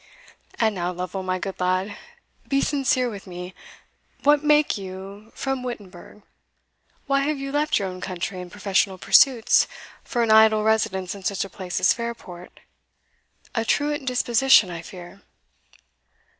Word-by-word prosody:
And 220 -2 +2
now, 180 -2 -2
Lovel, 180 +1 -5
my 185 0 -2
good 190 +1 -6
lad, 185 +3 0 0.5
be 275 - +1
sincere 265 -3 +1
with 205 -5 -8
me 180 0 -8 0.7
What 290 +1 +4
make 300 0 +3
you 195 +2 -9
from 270 -1 -2
Wittenberg? 205 -4 -9 0.8
why 275 -1 +2
have 290 +2 -1
you 275 0 -5
left 295 +1 +1
your 200 - -1
own 185 0 -8
country 185 0 -4
and 180 -1 -10
professional 195 -1 0
pursuits, 235 +4 +4 0.4
for 240 - -1
an 225 - +1
idle 220 0 +6
residence 195 -4 0
in 200 -1 -11
such 195 +1 -1
a - - -10
place 185 -1 -4
as - - +4
Fairport? 230 -7 -8 0.9
A 225 - 0
truant 290 +3 -1
disposition, 245 -4 +4
I 170 -1 -6
fear." 180 +2 -12
205 Hz, 145 wpm, -23 LUFS, 185-250 Hz, 0.9 s, idle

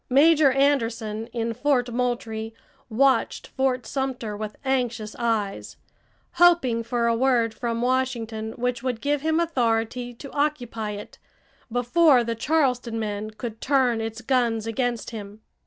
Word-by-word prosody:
Major 290 +2 +5
Anderson 230 -5 0
in 230 -1 -3
Fort 250 0 +1
Moultrie 230 -2 -2 0.3
watched 260 +2 +2
Fort 260 -2 -1
Sumter 255 -6 -3
with 210 0 -5
anxious 240 -5 -1
eyes, 220 -4 -2 0.5
hoping 335 -10 +4
for 235 +1 -1
a 230 0 +3
word 235 -2 +2
from 230 +1 -2
Washington 235 -4 -1
which 245 0 -2
would 250 -3 -2
give 290 +1 0
him 320 +2 +1
authority 245 -5 0
to 275 +3 -10
occupy 245 -8 -2
it 205 0 -9 0.5
before 250 +3 +4
the 230 0 -2
Charleston 250 -3 0
men 210 -1 -3
could 220 +1 -7
turn 260 -5 +2
its 225 +1 -5
guns 235 -4 +1
against 240 +1 -2
him. 210 -1 -8
240 Hz, 135 wpm, -24 LUFS, 225-265 Hz, 0.5 s, Major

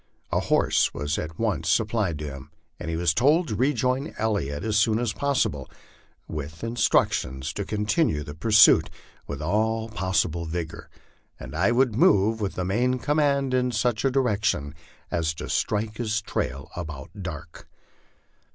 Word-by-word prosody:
A - - +2
horse - - +2
was 75 +1 -2
at 80 0 -6
once - - -1
sup 110 - +2
plied 100 -9 -1
him, 70 -1 -7 0.3
and - - -5
he 80 - -2
was 85 -1 +2
told 150 - +3
to 105 - -2
rejoin 130 +3 0
Elliot 100 -9 -1
as 110 -1 -1
soon 110 +1 +3
as 115 -2 -1
possible, 135 - -1 0.6
with 75 +2 -6
instructions 80 - +1
to 100 - -4
continue 105 - 0
the 75 - -8
pursuit 105 +7 +5 0.4
with - - -5
all 110 +1 0
possible 95 -5 -1
vigor, 80 0 -5 0.5
and - - -8
I 95 +7 +2
would 120 -2 +2
move 110 +1 +3
with 100 - -2
the 90 - -2
main 125 +7 +1
command 140 -1 +1
in 125 0 +2
such 110 0 0
direction 105 - 0 0.4
as 80 -1 0
to - - -6
strike 105 +1 -1
his 110 -2 0
trail 70 -9 -4
about 80 -6 -7
dark. 80 -3 -8
105 Hz, 150 wpm, -25 LUFS, 80-120 Hz, 0.6 s, pursuit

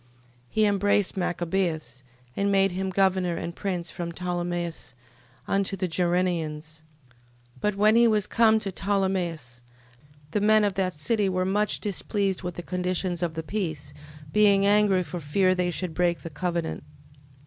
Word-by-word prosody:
13:24. 120 - -32 0.4
He 215 - +2
embraced 205 -1 +2
Machabeus, 175 -6 -2 0.3
and 200 0 +1
made 195 -1 +3
him 190 +1 -2
governor 185 -2 +1
and 170 +1 -5
prince 180 -4 -3
from 170 -2 -5
Ptolemais 175 -5 -4 0.5
unto 195 0 0
the 185 0 -1
Gerrenians. 165 -3 -1 0.8
13:25. - - -26
But 210 -1 0
when 210 +2 +4
he 235 0 +6
was 210 -3 +2
come 220 0 +4
to 195 - -3
Ptolemais, 180 -10 -2 0.7
the 205 - 0
men 215 +1 +5
of 205 -1 +1
that 185 -2 -1
city 205 +6 0
were 185 0 0
much 205 +3 +1
displeased 200 -1 -2
with 180 -2 -5
the 175 - -6
conditions 180 0 -2
of 170 -2 -2
the 160 - -3
peace, 155 -6 -4 0.4
being 200 -2 +5
angry 200 -2 +4
for 175 +2 -6
fear 185 +5 +2
they 180 -1 0
should 175 -1 -3
break 170 -3 +1
the 165 - -8
covenant. 170 +1 -3
185 Hz, 160 wpm, -26 LUFS, 170-200 Hz, 0.8 s, he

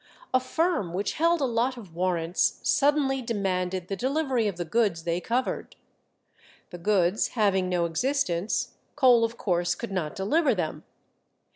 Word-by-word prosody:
A 255 - +5
firm 255 - -1
which 195 +2 -1
held 335 +1 +2
a - - +3
lot 245 +1 0
of 195 -8 -11
warrants 175 0 0
suddenly 280 -2 +2
demanded 185 -5 -2
the 195 - -3
delivery 260 -1 0
of 195 -4 -3
the 175 - -3
goods 195 -3 0
they 170 +1 -1
covered. 245 +5 -2 1.0
The 175 - -8
goods 190 +1 +2
having 190 -4 +2
no 175 -2 +1
existence, 185 - -1 0.2
Cole 250 -5 +5
of 230 +1 -1
course 175 -2 0
could 235 - -6
not 175 -6 -3
deliver 265 - +2
them. 165 -4 -4
205 Hz, 150 wpm, -26 LUFS, 180-255 Hz, 1.0 s, A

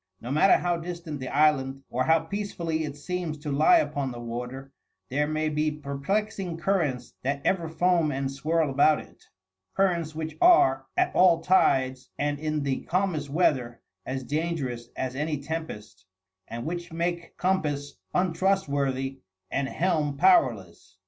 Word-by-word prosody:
No 120 - -6
matter 155 +7 +5
how 175 -1 0
distant 170 -3 -6
the 130 - -5
island 135 -2 +2
or 130 +1 0
how 160 +2 +4
peacefully 165 -3 -3
it 145 -1 -7
seems 170 0 -4
to 145 0 -5
lie 150 - +5
upon 140 - -1
the 120 - -7
water, 125 +3 -6 0.4
there 150 +3 0
may 155 0 -1
be 155 0 +1
perplexing 165 +6 -3
currents 160 -9 -1
that 140 +2 -1
ever 170 -4 +1
foam 170 -1 +2
and 135 0 -2
swirl 155 +2 0
about 145 +3 +4
it - - -15 0.5
currents 170 -5 +1
which 160 -1 -4
are, 135 - +5
at - - +2
all 175 -3 +5
tides 130 -7 +2
and 145 0 -1
in 155 -1 -1
the 135 -2 -1
calmest 175 -5 -1
weather, 130 -7 +1 0.2
as 130 +3 -4
dangerous 140 -6 -3
as 130 -1 -3
any 150 +2 -1
tempest, 140 -11 -7 0.4
and 115 +1 -6
which 175 +1 -4
make 170 +1 -3
compass 150 -7 -1
untrustworthy 145 -8 0 0.3
and 135 -1 -1
helm 155 -5 0
powerless. 125 - +2
150 Hz, 150 wpm, -27 LUFS, 135-170 Hz, 0.5 s, matter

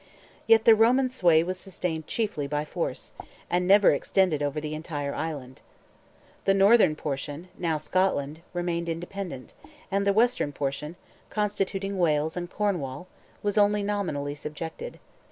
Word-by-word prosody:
Yet 225 -1 +6
the 230 - +9
Roman 245 +4 +4
sway 175 -10 +4
was 185 +1 -4
sustained 170 -5 -4
chiefly 205 -11 -2
by 150 +1 -2
force, - - -4 0.4
and 180 0 +1
never 200 +1 +7
extended 160 +1 +1
over 145 +1 -1
the 150 0 -5
entire 150 -2 -4
island. 140 -5 -5 0.8
The 195 - +4
northern 195 -4 +5
portion, 145 +4 -5
now 165 -3 -1
Scotland, 155 -3 0
remained 175 -1 -2
independent, 170 -4 -6 0.4
and 200 +1 +1
the - - +5
western 220 -8 +2
portion, 145 +4 -3 0.3
constituting 200 -2 -2
Wales 155 -2 +1
and 175 -1 -4
Cornwall, 175 -8 -2 0.4
was 205 0 +1
only 205 0 +3
nominally 180 -9 -2
subjected. 155 - -7
175 Hz, 135 wpm, -27 LUFS, 150-200 Hz, 0.8 s, the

